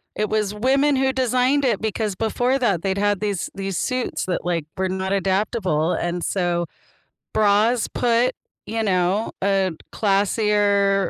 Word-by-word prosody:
It 215 0 -1
was 210 -1 0
women 270 +6 +2
who 265 0 +2
designed 260 +2 +1
it 230 -6 +1
because 215 -2 -2
before 245 +6 0
that 200 -9 +1
they'd 195 0 -1
had 205 0 +1
these 200 -4 -2
these 195 -1 -3
suits 255 -1 -2
that, 180 -1 -3
like, 170 -3 -1
were 190 0 -1
not 190 +1 -2
adaptable 190 -4 0
and 175 0 -2
so 175 -2 0 0.7
bras 220 +3 +3
put, 245 +1 +1 0.3
you 225 +1 -2
know, 190 +2 +1
a 195 -1 +2 0.2
classier 200 -1 +2
205 Hz, 145 wpm, -22 LUFS, 190-230 Hz, 0.7 s, bras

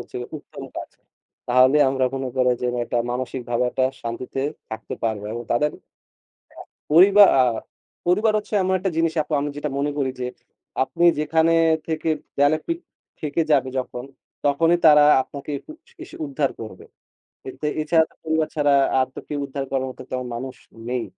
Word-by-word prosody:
হচ্ছে - - -9
গিয়ে 120 - -7
উত্তম - - -11
কাজ। - - -6 0.6
তাহলে 130 +3 +5
আমরা 130 -1 0
কোন 135 - -3
করেন 125 -1 +3
যে, - - +1
না - - -2
একটা 120 - -1
মানসিকভাবে 125 -1 -2
একটা 130 - +1 0.2
শান্তিতে 120 +3 -4 0.3
থাকতে 110 0 -6
পারব। 110 -3 -1
এবং 120 +1 -4
তাদের 150 +6 +2 0.9
আ - - -9 0.3
পরিবা 195 +5 +8 0.2
আ - - +7 0.6
পরিবার 210 +5 +3
হচ্ছে 210 +1 -6
এমন 190 0 +1
একটা 190 +1 -1
জিনিস 165 0 +2
আপু, 150 - -10
আমি 145 - -2
যেটা 150 0 -3
মনে 145 +1 0
করি 135 -2 0
যে, 125 - -1 0.6
আপনি 170 +6 -1
যেখানেই 165 +2 +3 0.3
থেকে 160 0 -2 0.3
দেয়ালে 145 +2 +3
পীঠ 335 0 -2 0.4
ঠেকে 155 +2 0
যাবে 135 -2 +3
যখন। 125 -1 -5 0.4
তখনি 165 +4 +3
তারা 150 -1 +8 0.2
আপনাকে 140 +2 -9 0.2
উস 320 +1 -15
এসে 340 - -11
উদ্ধার 140 0 -1
করবে। 110 -5 -9 0.6
এতে 150 +3 -5
এ - - +1
ছাড়া 160 -1 +3
পরিবার 160 0 0
ছাড়া 145 -2 +2 0.3
আর 130 - +3
তো - - -6
কেউ 145 - -3
উদ্ধার 140 0 -4
করার 130 -1 -1
মতো 130 - -10
তেমন 125 -1 -3
মানুষ 130 +1 -6 0.3
নেই। 125 -1 -1
140 Hz, 175 wpm, -23 LUFS, 125-160 Hz, 0.9 s, পরিবা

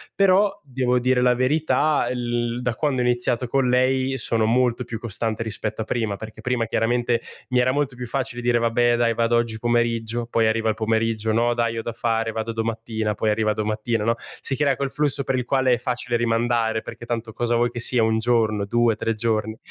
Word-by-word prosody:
Però 195 +1 +3
devo 125 -2 0
dire 125 0 +2
la 125 0 +4
verità, 150 +2 +1
l 120 -1 -2
da 125 -1 -1
quando 135 -1 0
ho - - +1
iniziato 120 0 +1
con 130 +1 +1
lei 130 +1 +2
sono 115 -2 0
molto 125 +1 +2
più 115 -1 -5
costante 115 0 -2
rispetto 110 0 -4
a - - 0
prima, 110 -3 -1
perché 110 +2 -10
prima 125 -2 0
chiaramente 120 +1 0 0.3
mi 125 -1 +2
era 125 +1 +3
molto 140 -1 -1
più 125 0 -6
facile 125 0 -3
dire: 120 0 +2
"Vabbè 120 +1 +2
dai, 115 -1 +2
vado 115 +1 +1
oggi 115 -1 0
pomeriggio", 120 0 0
poi 115 -1 +2
arriva 110 0 +1
il 110 - 0
pomeriggio: 110 0 0
"No 120 +2 +2
dai, 115 -1 -1
ho 115 - -3
da 115 - -3
fare, 115 0 -1
vado 110 +1 -3
domattina", 110 -1 -2
poi 110 - -1
arriva 110 0 +1
domattina, 110 +1 -1
no? 115 +2 +2 0.3
Si 135 - -1
crea 145 -2 +2
quel 140 +1 -2
flusso 145 -2 +1
per 135 - -1
il 125 - -2
quale 130 -1 +2
è - - +2
facile 125 -1 -2
rimandare 115 -1 +1
perché 120 - -9
tanto 115 -1 -4
cosa 120 +1 0
vuoi 120 +1 +2
che 120 - -6
sia 120 +1 0
1 110 0 +2
giorno, 110 -3 +1
2, 120 +2 +2
3 115 - -1
giorni. 110 -1 -1
120 Hz, 210 wpm, -23 LUFS, 115-125 Hz, 0.3 s, la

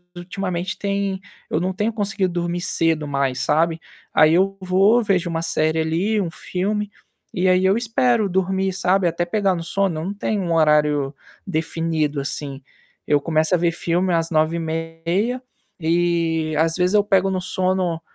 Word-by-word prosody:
ultimamente 180 0 -4
tem 200 -1 -1 0.3
eu 155 - 0
não 185 +2 -1
tenho 210 +4 -1
conseguido 200 -4 -1
dormir 175 0 -2
cedo 165 -4 0
mais, 140 -2 -1
sabe? 160 +2 +1 0.3
Aí, 155 +1 +5
eu 195 +3 +2
vou 195 +6 +3
vejo 185 -5 +1
uma 165 -1 -2
série 160 -1 0
ali, 175 +7 0
um 180 - -2
filme. 205 +5 -3 0.4
E 185 0 +1
aí, 185 +1 +3
eu 190 +1 +4
espero 235 -2 +1
dormir, 190 +1 0
sabe, 185 0 +2
até 170 +1 -1
pegar 195 +1 +1
no 170 - -4
sono. 190 -2 -1
Eu 160 - -4
não 195 - -3
tenho 205 0 -2
um 170 -2 -1
horário 150 -3 +3 0.3
definido, 160 -3 -1
assim. 140 0 -5 0.4
Eu 145 - +3
começo 155 +2 +1
a - - +2
ver 170 0 +1
filme 175 +2 0
às 165 0 +1
21h30. 165 +7 -1 0.4
E, 165 -1 0
às 165 +1 +2
vezes, 180 +1 +1
eu 210 -1 +5
pego 195 -2 +2
no 185 -1 -1
sono, 185 -2 -1
175 Hz, 165 wpm, -21 LUFS, 165-195 Hz, 0.4 s, Aí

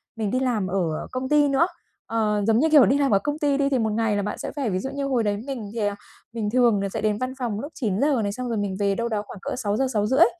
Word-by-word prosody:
mình 215 -3 -2
đi 255 - +1
làm 235 -7 0
ở 175 -4 -2
công 255 +1 -3
ty 295 -1 +4
nữa. 280 +5 +3 0.4
Ờ, 215 -2 0
giống 225 0 +4
như, 320 +4 +3
kiểu, 300 -4 +7
đi 270 - +3
làm 280 -1 +2
ở 200 - +5
công 290 +8 -3
ty 285 -2 +2
đi 280 -1 +2
thì 265 -2 +1
một 220 -1 0
ngày 225 -1 +1
là 205 - +1
bạn 210 - -3
sẽ - - -5
phải 275 -6 -1
ví 185 -2 -1
dụ 265 - -4
như 280 0 -3
hồi 255 -4 +1
đấy 205 -1 0
mình 240 -7 -5
thì, 230 - -4
à, 205 - -2 0.4
mình 220 -3 -2
thường 235 -3 +3
là 200 - -2
sẽ - - -4
đến 210 -1 +1
văn 255 +3 -3
phòng 230 -5 -2
lúc 290 +7 -6
9:00 240 +4 +1
này, 200 - -1
xong 250 +3 -4
rồi 230 - -1
mình 200 -2 -2
về 200 -1 +1
đâu 235 +2 -2
đó 215 -2 -1
khoảng - - -9
cỡ - - -3
6:00, 220 +2 0
6:30. 230 +9 +4
230 Hz, 300 wpm, -24 LUFS, 205-270 Hz, 0.4 s, kiểu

